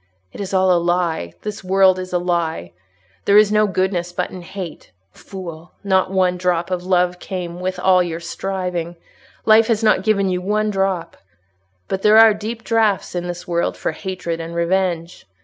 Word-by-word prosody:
It - - -7
is 195 - -5
all 190 -1 +3
a 175 - +2
lie—this 175 - -2
world 190 0 +4
is 185 0 -6
a 180 - +1
lie—there 100 - -2
is 210 -1 +6
no 215 0 +3
goodness 185 -2 -1
but - - -3
in 185 - -8
hate. 180 -2 -8 0.2
Fool! 175 - -10
not 190 -2 +2
one 185 -1 +1
drop 175 -1 -1
of 180 -1 -2
love 180 -1 +1
came 180 -3 -6
with 185 +1 -3
all 185 -1 +4
your 170 -2 -3
striving: 180 -1 -4 0.5
life 220 0 +6
has 225 -2 0
not 215 -3 +4
given 200 -1 +1
you 180 -1 -1
one 210 +3 0
drop. 195 -3 -2 0.7
But 190 - -3
there 210 +1 +5
are 225 -1 +8
deep 220 +2 -6
draughts 220 -4 +1
in 175 0 -3
this 175 0 -6
world 170 -1 -1
for - - -2
hatred 175 -1 -5
and 165 +1 -6
revenge. 170 -1 -1
185 Hz, 175 wpm, -20 LUFS, 175-195 Hz, 0.7 s, are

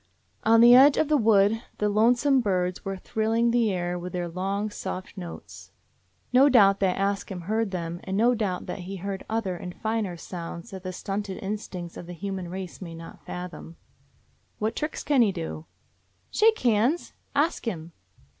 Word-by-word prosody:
On 225 +1 +6
the 240 +1 +9
edge 275 +3 +8
of 310 - +2
the 305 - +4
wood 220 -3 +4 0.2
the 210 - +1
"lonesome 240 +6 +3
birds" 180 -4 -1
were 195 0 -4
thrilling 225 +4 0
the 235 -3 +2
air 175 -1 -2
with 180 +1 -7
their 175 -1 -2
long, 195 +4 -2
soft 190 -1 -6
notes. 175 -4 -9 0.6
No 270 +3 +7
doubt 200 -6 +6
that 190 -2 +1
Ask 200 +1 -1
Him 185 -3 -5
heard 215 +4 -1
them, 170 -2 -4
and 190 0 -3
no 235 +3 +4
doubt 205 -6 -2
that - - -5
he 185 +2 -6
heard 195 +1 -5
other 215 -5 -1
and 180 0 -7
finer 220 -5 -2
sounds 170 +4 -7
that 190 -1 -7
the 185 0 -5
stunted 195 +1 -4
instincts 190 -4 -5
of 170 - -8
the 175 - -7
human 190 0 -5
race 185 +1 -7
may 170 -3 -7
not 165 0 -11
fathom. 180 -2 -7 0.8
"What 215 +1 -1
tricks 305 +1 -3
can 285 -4 +3
he 215 -4 +4
do?" 165 -3 -6 0.6
"Shake 445 +1 +4
hands, 240 +8 +1 0.2
Ask 290 -3 +1
Him." 170 -5 -4
195 Hz, 180 wpm, -26 LUFS, 180-225 Hz, 0.8 s, the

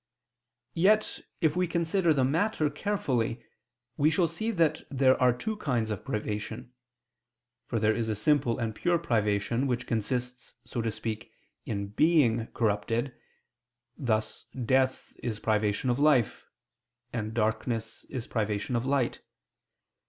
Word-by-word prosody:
Yet, 210 +5 +3 0.2
if 155 -3 +3
we 180 0 +1
consider 170 +1 +1
the 140 -4 +3
matter 155 +2 +1
carefully, 130 - -1 0.5
we 150 +2 +4
shall 165 +2 +2
see 220 +7 -2
that 165 -7 +2
there 130 -2 +4
are 125 -1 +6
two 210 - -3
kinds 120 - -1
of 105 - -4
privation. 105 +3 -4 0.9
For 115 - -1
there 110 0 +3
is 110 0 -2
a 110 - 0
simple 125 +2 +2
and 115 -2 -2
pure 175 +9 +1
privation, 115 -3 0
which 125 -1 -1
consists, 125 +2 -3
so 120 - -3
to 115 - 0
speak, 110 0 -5 0.4
in 100 -2 -3
being 120 -3 +3
corrupted; 115 +3 -1 0.8
thus 110 -4 -1 0.2
death 130 +1 +1
is 115 -3 -3
privation 105 +3 +1
of 120 - -1
life, 140 -7 +3 0.7
and 110 -2 -3
darkness 115 0 -1
is 125 -4 -5
privation 105 +1 -1
of 120 +2 -1
light. 135 -3 0
120 Hz, 135 wpm, -29 LUFS, 110-150 Hz, 0.9 s, are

